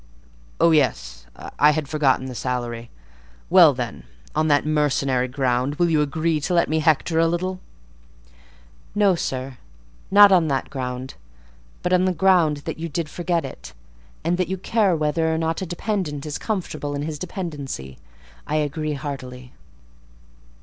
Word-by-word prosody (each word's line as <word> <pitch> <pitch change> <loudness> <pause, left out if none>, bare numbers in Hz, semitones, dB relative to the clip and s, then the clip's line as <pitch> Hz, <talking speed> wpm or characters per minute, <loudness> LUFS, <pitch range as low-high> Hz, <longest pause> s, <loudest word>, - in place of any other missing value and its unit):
Oh 170 - +5
yes, - - 0 0.3
I 150 +1 +6
had 155 -1 -2
forgotten 140 -3 +1
the 130 - -6
salary! 120 -2 -4 0.6
Well 175 -4 +8
then, 125 - -5 0.3
on 155 +1 +2
that 145 -1 +3
mercenary 140 -4 +1
ground, 130 +1 0
will 170 +1 +1
you 155 -2 +3
agree 155 +2 0
to 165 +5 -1
let 170 - +3
me 160 +1 0
hector 160 +1 +2
a 165 - +4
little?" 185 +2 -2 1.4
"No, 205 -2 +4
sir, 130 -6 -4 0.5
not 205 0 +8
on 175 -4 +4
that 135 -2 -2
ground; 130 -1 -5 0.7
but, 180 - 0
on 180 0 +4
the 185 - +1
ground 175 -4 +3
that - - -5
you 165 +1 -4
did 160 0 -3
forget 170 -2 -1
it, 130 - -10 0.5
and 175 +3 0
that 185 - +1
you 190 - -3
care 195 -1 +1
whether 160 +1 0
or 160 - 0
not 165 +1 -1
a 190 - -3
dependent 175 -5 -3
is 150 -1 -4
comfortable 155 -8 -3
in 145 - -3
his 150 -1 -5
dependency, 145 - -6 0.5
I 150 - -1
agree 155 0 -1
heartily." 130 -3 -7
155 Hz, 155 wpm, -22 LUFS, 135-170 Hz, 1.4 s, Well